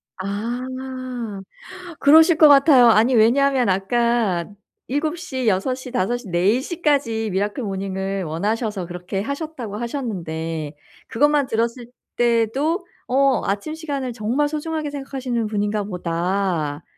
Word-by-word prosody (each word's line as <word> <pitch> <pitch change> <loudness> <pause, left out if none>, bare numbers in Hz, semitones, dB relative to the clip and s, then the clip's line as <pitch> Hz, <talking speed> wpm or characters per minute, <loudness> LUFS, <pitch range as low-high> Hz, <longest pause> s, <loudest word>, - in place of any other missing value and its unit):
아. 205 +6 -4 1.4
그러실 315 +3 +6
것 310 - +8
같아요. 275 -3 +7
아니 225 +3 +4
왜냐하면 255 +2 +3
아까 200 -1 +1 0.4
7 305 +5 -1
시, 260 -7 -4
6 210 +6 +1
시, 255 -1 -9
5 245 -1 0
시, 245 -3 -11
4 185 +7 +2
시까지 280 - 0
미라클 205 +7 -2
모닝을 195 -1 -3
원하셔서 205 +4 -2
그렇게 180 +2 -4
하셨다고 280 -4 -5
하셨는데 165 - -4 0.3
그것만 290 +2 +2
들었을 235 +1 -2 0.3
때도 240 - +1 0.2
어 270 0 +3
‘아침 200 +10 -2
시간을 280 -6 -4
정말 240 +6 0
소중하게 310 0 -3
생각하시는 265 -5 -3
분인가 210 0 -1
보다.‘ 175 -4 -2
230 Hz, 260 characters per minute, -21 LUFS, 195-275 Hz, 1.4 s, 것